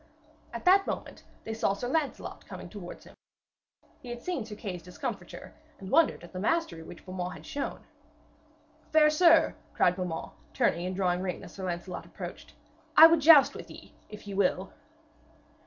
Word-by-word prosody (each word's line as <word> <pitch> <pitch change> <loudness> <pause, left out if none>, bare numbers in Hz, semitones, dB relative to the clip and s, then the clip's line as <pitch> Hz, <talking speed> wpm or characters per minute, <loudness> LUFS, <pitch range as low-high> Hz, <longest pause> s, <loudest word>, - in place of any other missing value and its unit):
At - - -7
that 385 +2 +5
moment - - -6 0.2
they 220 - -5
saw 220 -3 +1
Sir 220 +5 -5
Lancelot 290 +1 -3
coming - - -9
towards - - -9
him. - - -15 0.9
He 245 - -11
had 240 0 -7
seen 350 -9 -2
Sir 215 -1 -9
Kay's 190 -4 -6
discomfiture, 180 +1 -7 0.2
and 190 +1 -9
wondered 320 - +3
at 175 - -13
the 185 - -5
mastery 275 - 0
which 170 +1 -12
Beaumains 185 -1 -5
had - - -13
shown. 285 -2 -5 1.1
'Fair 305 -1 +5
sir,' 330 +1 +5 0.2
cried 180 - +3
Beaumains, 180 -3 -4 0.2
turning 175 +2 +1
and 185 - -4
drawing 180 -2 0
rein 185 -2 -4
as - - -11
Sir 190 - -6
Lancelot 175 0 -5
approached, - - -9 0.4
'I 320 - +12
would 330 -1 +3
joust 295 -2 +8
with - - -10
you, - - -12 0.2
if 210 - -11
ye 200 - -6
will.' 190 -1 0
200 Hz, 170 wpm, -29 LUFS, 180-300 Hz, 1.1 s, I